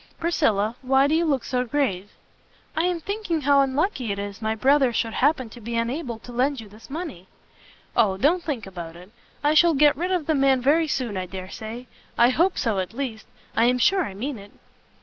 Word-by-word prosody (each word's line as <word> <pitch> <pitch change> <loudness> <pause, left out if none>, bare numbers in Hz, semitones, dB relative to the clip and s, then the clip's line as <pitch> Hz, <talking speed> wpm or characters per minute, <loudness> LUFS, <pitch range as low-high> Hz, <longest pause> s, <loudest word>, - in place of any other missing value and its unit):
Priscilla, 225 -11 +1
why 270 +1 +3
do 290 - +1
you 335 +1 +2
look 275 -6 0
so 250 -1 -1
grave?" 225 -8 -1 0.7
"I 320 - +1
am 360 -1 0
thinking 380 -3 -3
how 280 0 +4
unlucky 270 - 0
it 200 - -3
is 200 +1 -6
my 220 0 -1
Brother 265 +2 +3
should 225 -1 -1
happen 275 -2 +1
to 240 - -12
be 235 +2 -5
unable 235 +2 -2
to 245 - -12
lend 260 +3 0
you 220 - -9
this 215 +5 -16
money." 280 - -6 0.7
"O, 205 -5 +3
don't 320 - +2
think 280 -10 -4
about 170 -4 -8
it; 180 +3 -14 0.3
I 295 +1 +3
shall 330 +1 +5
get 295 +1 +5
rid 350 +6 -2
of 360 -5 0
the 315 - +1
man 270 -2 +3
very 305 +6 +3
soon 245 -9 -2
I 185 -1 -3
dare 185 0 -8
say 225 +3 -7 0.3
I 235 +1 +6
hope 345 +8 +2
so, 220 -5 0
at 185 +4 -4
least 245 -5 -5 0.3
I 230 - +4
am 250 +1 +3
sure 375 +9 +3
I 195 - -6
mean 250 +3 -4
it." 200 +1 -13
255 Hz, 215 wpm, -24 LUFS, 220-300 Hz, 0.7 s, I